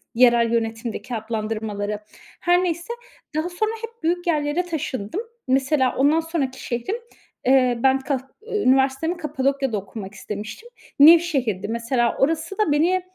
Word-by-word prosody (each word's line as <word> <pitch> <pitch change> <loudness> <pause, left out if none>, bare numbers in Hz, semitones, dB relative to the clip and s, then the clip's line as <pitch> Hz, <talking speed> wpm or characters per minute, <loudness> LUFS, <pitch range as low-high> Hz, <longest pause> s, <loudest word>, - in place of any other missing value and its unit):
yerel 235 -1 +5
yönetimdeki 225 +1 -2
adlandırmaları. 215 -2 -3 0.4
Her 355 0 +3
neyse. 345 +5 -2 0.4
Daha 315 +3 0
sonra 430 +5 -1
hep 460 +1 -9
büyük 350 +2 0
yerlere 300 +1 +1
taşındım. 310 - -3 0.3
Mesela 265 0 +2
ondan 290 +4 +4
sonraki 320 -5 -3
şehrim, 240 - -2 0.5
eee, 255 -2 +4
ben 265 0 +4
kah 265 0 -1 0.3
üniversitemi 270 -1 +2
Kapadokya'da 275 -5 -1
okumak 195 0 -7
istemiştim. 210 - -7 0.3
Nevşehir'di 280 - +5
mesela 235 +1 0
orası 325 +6 0
da 425 -8 +2
beni, 340 +6 +3
270 Hz, 125 wpm, -23 LUFS, 230-330 Hz, 0.5 s, yerel